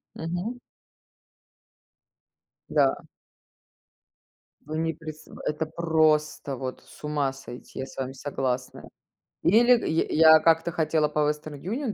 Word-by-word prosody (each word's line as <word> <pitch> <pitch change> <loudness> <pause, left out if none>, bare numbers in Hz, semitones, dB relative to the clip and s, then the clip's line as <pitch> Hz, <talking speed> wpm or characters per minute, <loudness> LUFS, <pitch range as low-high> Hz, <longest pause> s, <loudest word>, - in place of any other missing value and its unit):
Мгм. 175 +9 -4 2.1
Да. - - +2 1.6
Вы 155 +1 -5
не 165 0 0
прис 155 0 -10 0.2
это 155 +1 -1
просто 155 -3 +1
вот, 130 0 -5
с - - -17
ума 145 -3 0
сойти, 130 -2 -10
я - - -2
с - - -14
вами 135 0 -3
согласная. 130 -2 -4 0.5
Или 240 +6 +6
я 160 - +1 0.3
я - - +6
как-то 165 +1 +3
хотела 155 -1 +1
по 150 0 -3
Western 150 -1 -5
Union 225 - -3
155 Hz, 115 wpm, -26 LUFS, 145-165 Hz, 2.1 s, Или